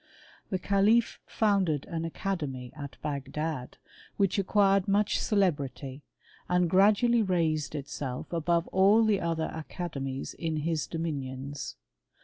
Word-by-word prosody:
That 185 -2 -2
calif 210 +4 +3
founded 190 -9 +1
an 165 -1 -3
academy 150 -8 -4
at 145 -2 -8
Bagdad, 145 -1 -4 0.4
which 200 0 +2
acquired 195 -1 +3
much 205 +1 +2
celebrity, 145 - 0 0.5
and 180 0 +3
gradually 210 +6 +4
raised 160 -7 0
itself 140 0 -5
above 170 +1 +1
all 200 +4 +5
the 210 -3 +3
other 165 -1 -1
academies 145 -5 -5
in 160 -2 -3
his 160 0 -1
dominions. 140 -4 -4
165 Hz, 115 wpm, -29 LUFS, 145-195 Hz, 0.5 s, all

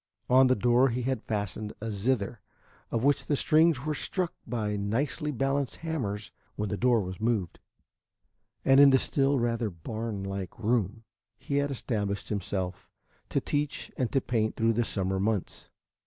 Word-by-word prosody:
On 130 +1 +7
the 130 - +4
door 120 +4 +4
he 125 +1 -2
had 130 -2 -1
fastened 105 0 -3
a 115 +1 -4
zither, 105 0 -1 0.5
of 115 0 -1
which 145 +1 +2
the 145 - +2
strings 155 -1 +3
were 155 - 0
struck 180 +3 -2
by 110 -3 -1
nicely 130 +9 -1
balanced 135 0 0
hammers 110 -11 -3 0.2
when 105 -1 -2
the 105 - -1
door 120 +1 +3
was 95 +1 -6
moved, 110 -7 0 1.1
and 135 0 +6
in 140 0 +9
the 135 - +6
still 135 +1 +2
rather 115 -2 0
barn 105 +4 -5
like 100 +4 -5
room, 115 -1 0 0.3
he 140 - -2
had 145 0 +1
established 105 -6 -2
himself 95 -3 -3 0.4
to - - +1
teach 145 0 -2
and 125 -3 -1
to 135 - +2
paint 110 -3 0
through 115 0 +2
the 115 +1 +1
summer 95 -2 0
months. 100 -1 -2
115 Hz, 165 wpm, -29 LUFS, 105-135 Hz, 1.1 s, in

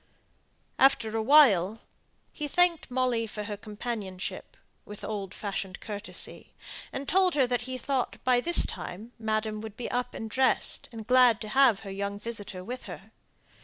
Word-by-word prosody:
After 230 -5 +4
a 225 - +1
while, 220 - +5 0.5
he 300 - -3
thanked 350 0 +2
Molly 250 -3 0
for 210 0 -5
her 205 0 -4
companionship, 210 - -6 0.3
with 210 0 -9
old 200 -3 -4
fashioned 195 -2 -5
courtesy; 210 -1 -5 0.4
and 270 0 -5
told 370 -1 +3
her 275 -3 +4
that 245 0 -1
he 255 - -3
thought, 255 0 -2
by 250 -1 +3
this 345 +5 +4
time, 210 +7 -6
madam 215 -1 -1
would 220 -1 -8
be 245 - -5
up 245 0 -2
and 225 - -5
dressed, 260 +4 +1
and 225 -2 -8
glad 250 -2 +5
to 215 - -5
have 250 -3 +4
her 195 - -7
young 200 +1 -3
visitor 205 -4 -4
with 250 +6 -7
her. - - -10
225 Hz, 165 wpm, -28 LUFS, 210-255 Hz, 0.5 s, while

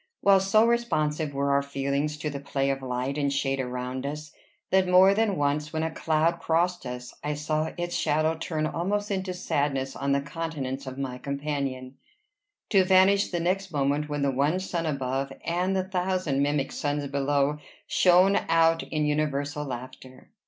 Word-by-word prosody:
while 195 -1 +6
so 195 +4 +4
responsive 155 -11 0
were 140 0 0
our 140 0 +3
feelings 140 +2 -2
to 150 - -4
the 140 -1 -4
play 140 -1 -1
of 135 0 -3
light 130 +2 -2
and 140 -1 +1
shade 135 -1 0
around 125 0 -4
us, 150 +2 -5 0.4
that 190 -1 +4
more 185 +2 +6
than 210 -1 +1
once 145 +1 0
when 160 0 -2
a 160 - -1
cloud 160 +1 +1
crossed 175 -2 0
us, 125 0 -7
I 150 0 -1
saw 155 +1 -1
its 175 0 -3
shadow 155 +1 +1
turn 160 -1 -2
almost 205 +6 -2
into 190 -1 -2
sadness 140 -6 -1
on 140 0 -1
the 140 - +3
countenance 140 -3 -5
of 130 0 -6
my 130 -2 -4
companion, 140 -2 -4 0.7
to 195 -3 +5
vanish 190 +2 +4
the 175 - -2
next 185 +2 -1
moment 145 0 0
when 145 -1 -2
the 140 - +2
one 145 +7 +1
sun 175 -3 -3
above 135 -1 -2
and 180 +3 0
the 190 - +1
thousand 185 -6 -1
mimic 145 -1 0
suns 145 0 -2
below 140 +1 0 0.3
shone 185 +1 +4
out 165 0 +4
in 155 -1 -2
universal 150 0 -1
laughter. 130 0 -9
150 Hz, 175 wpm, -27 LUFS, 140-175 Hz, 0.7 s, while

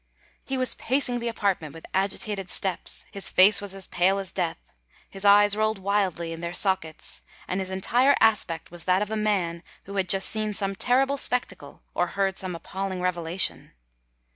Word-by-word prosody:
He 270 - -3
was 255 -1 +1
pacing 255 -1 0
the 235 - -3
apartment 195 -9 -1
with 165 - -10
agitated 195 0 -1
steps; 190 -1 -2
his 200 - +1
face 200 +3 +6
was 200 -1 -5
as 195 - -5
pale 190 +3 +2
as 195 -2 -4
death—his 165 - -6
eyes 205 0 +6
rolled 215 0 +1
wildly 190 -4 -1
in 165 - -8
their 170 0 -4
sockets—and 185 0 -1
his 190 -1 -3
entire 240 +9 +3
aspect 190 -8 +1
was 175 -2 -7
that 185 +2 +3
of 210 - -7
a - - -1
man 195 -6 0 0.2
who 200 +1 -7
had 185 -2 0
just 195 0 +2
seen 215 -1 -1
some 195 -1 -1
terrible 265 +6 +2
spectacle, 245 - -3
or 175 - +1
heard 195 -1 0
some 185 -2 -4
appalling 190 +3 -4
revelation. 180 0 -1
195 Hz, 170 wpm, -26 LUFS, 180-210 Hz, 0.2 s, face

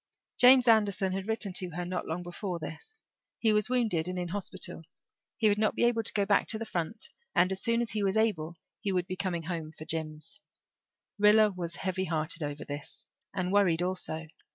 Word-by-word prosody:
James 250 0 +8
Anderson 205 -4 +3
had 190 +1 -4
written 220 -3 -1
to 180 -1 -1
her 175 0 -3
not 180 0 -3
long 165 +3 -3
before 175 +1 -4
this; 440 - -8 0.3
he 220 -2 +3
was 210 +2 +2
wounded 220 -10 +1
and 180 0 -3
in 180 - -2
the 170 - -7
hospital; 200 -4 -3 0.6
he 220 - +3
would 205 0 +2
not 215 -1 +2
be - - +1
able 240 -1 +3
to 225 - +1
go 200 -1 +1
back 200 0 +2
to 220 - +2
the 225 - -5
front 180 +3 -3 0.3
and 180 +1 +4
as 190 - -3
soon 230 0 +1
as 235 - -4
he 215 - -1
was 200 +1 +1
able 175 -7 0 0.2
he 200 - -2
would 180 -2 0
be 185 0 -4
coming 180 -3 -2
home 165 -2 -4
for 155 - -8
Jims. 155 -1 -5 0.8
Rilla 210 +1 +6
was 170 -3 -5
heavy 190 0 -2
hearted 160 +1 -1
over 145 0 -4
this, 145 +2 -7 0.3
and 185 -1 -2
worried 180 -4 +3
also. 180 -3 -1
185 Hz, 210 wpm, -30 LUFS, 170-215 Hz, 0.8 s, James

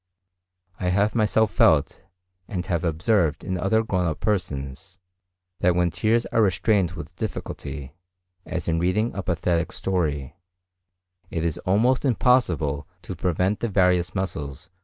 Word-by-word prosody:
I 90 - -1
have 100 +4 +2
myself 110 -1 +2
felt, 75 -8 +3 0.5
and 90 -2 -3
have 85 -2 -1
observed 85 0 +1
in 95 - -2
other 100 +5 +1
grown 90 -5 0
up 80 -2 -2
persons, 80 -4 -3 0.6
that 90 -1 +3
when 90 -1 +2
tears 110 +8 +1
are 115 - +3
restrained 95 -2 +2
with - - -9
difficulty, 70 -1 -5 0.5
as 90 - -4
in 80 -1 +1
reading 95 +7 +1
a 100 - -3
pathetic 85 -1 0
story, 75 -8 -2 0.9
it 80 - -2
is 80 - -1
almost 115 +7 +3
impossible 90 - +2 0.2
to 95 - -6
prevent 90 +4 0
the 115 - -1
various 90 -2 +2
muscles. 85 -3 -4
90 Hz, 140 wpm, -24 LUFS, 80-105 Hz, 0.9 s, felt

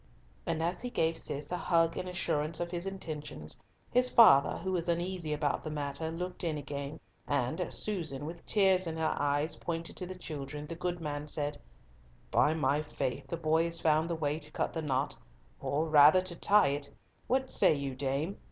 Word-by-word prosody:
And 165 -1 0
as 175 +2 -1
he 245 - -3
gave 165 -7 +1
Cis 145 0 -2
a 180 - 0
hug 165 -2 +2
in 185 - -4
assurance 160 -3 -1
of 175 0 -3
his 175 +1 -3
intentions, 150 - -5 0.4
his 250 +1 +3
father, 140 - +7
who 190 - -3
was 175 -2 -1
uneasy 170 -1 -1
about 150 -1 0
the 155 - -4
matter, 145 +1 -3
looked 180 +3 -5
in 160 -3 -1
again, 145 +1 -5 0.3
and 140 +4 0
as 180 - -2
Susan, 160 -9 -2
with 165 +2 -7
tears 190 -3 +3
in 160 0 -3
her 160 0 0
eyes, 145 +2 0
pointed 165 -1 -4
to 180 - -4
the 185 0 -7
children, 150 -3 -6
the 160 - -6
good 175 0 -3
man 150 -1 -4
said, 145 -1 -2 0.7
"By 155 - +4
my 145 -1 +1
faith, 140 -4 -4
the 170 - -3
boy 160 0 +2
has 170 0 -1
found 160 +1 +2
the 170 - 0
way 150 -1 -1
to 150 -1 -4
cut - - -2
the 160 - -2
knot—or 130 - -3
rather 155 +4 +7
to 185 -2 -4
tie 205 -3 +4
it. 140 0 -2 0.4
What 260 +1 +1
say 185 -6 +5
you, 140 -2 -3
dame? 140 +7 -2
160 Hz, 195 wpm, -31 LUFS, 145-175 Hz, 0.7 s, father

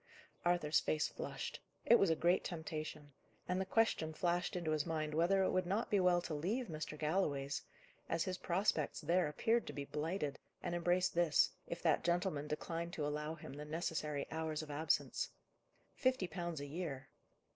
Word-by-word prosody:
Arthur's 175 -3 +3
face 155 -1 +1
flushed. - - -5 0.3
It 235 - +7
was 195 - +4
a 160 - +4
great 175 +3 +3
temptation: 155 -3 -5 0.3
and 180 +1 +1
the 190 - -3
question 190 -8 +2
flashed 175 +1 0
into 170 -3 -1
his 155 -1 +2
mind 155 -2 -2
whether 180 +5 +4
it - - +2
would 185 -1 +1
not 205 +5 0
be 205 - +4
well 180 -1 +4
to 165 - -4
leave 200 - -1
Mr. 155 -1 -4
Galloway's, 150 -4 0 0.5
as 165 0 +1
his 185 -2 -3
prospects 175 -4 +1
there 175 -1 +3
appeared 225 +10 +1
to 145 - -5
be 140 0 -4
blighted, 150 0 -2 0.2
and - - -2
embrace 175 +1 +3
this, 170 -3 +4 0.2
if 170 - -5
that 160 -3 +3
gentleman 170 -4 +1
declined 165 +3 -3
to 155 -5 -1
allow 150 +2 -2
him 155 -4 -9
the 145 +1 -6
necessary 150 -2 -2
hours 160 -1 -2
of 150 - -7
absence. 155 +3 +1 0.6
Fifty 255 -7 +2
pounds 170 -2 -4
a 145 - -4
year! 145 -3 -5
165 Hz, 180 wpm, -37 LUFS, 150-180 Hz, 0.6 s, It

